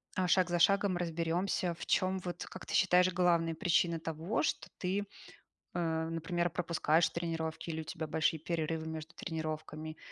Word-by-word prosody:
а, 185 -1 +1
шаг 180 0 +4
за 175 - +1
шагом 195 +1 +4
разберёмся, 170 +1 0
в - - -7
чём 185 +1 +2
вот, 175 -1 -5
как 185 - -9
ты - - -6
считаешь, 180 -2 +5
главные 170 -2 +3
причины 170 -2 +2
того, 165 +6 -2
что - - -1
ты, 195 +2 0 0.7
а, 160 -2 0
например, 170 +1 -1
пропускаешь 165 -1 +2
тренировки, 165 -1 -3
или 160 - -2
у 160 - -6
тебя 160 0 -4
большие 160 +1 +1
перерывы 160 0 -2
между 160 0 -6
тренировками. 155 -1 -4
170 Hz, 160 wpm, -33 LUFS, 160-180 Hz, 0.7 s, считаешь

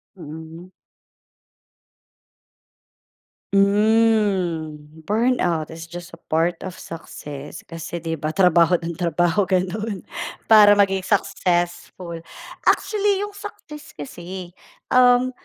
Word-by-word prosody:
Mm. 160 +1 -10 2.8
Hmm, 200 -5 +2 0.3
"Burnout 210 -9 +1
is 165 0 -9
just 175 +1 -9
a 165 - -13
part 165 +2 0
of 185 - -8
success" 145 -3 -9
kasi 165 0 -7
'di 165 -2 -3
ba 155 +3 -3
trabaho 180 -2 +5
ng 170 0 -3
trabaho 175 +2 +1
gano'n 190 +2 -1 0.5
para 210 -1 +9
maging 195 -1 +3
successful. 175 -1 -1 0.5
Actually 410 -1 +2
yung 415 - -5
success 405 -8 -10
kasi, 175 +4 -8 0.4
um, 250 0 +5
180 Hz, 95 wpm, -22 LUFS, 165-210 Hz, 2.8 s, para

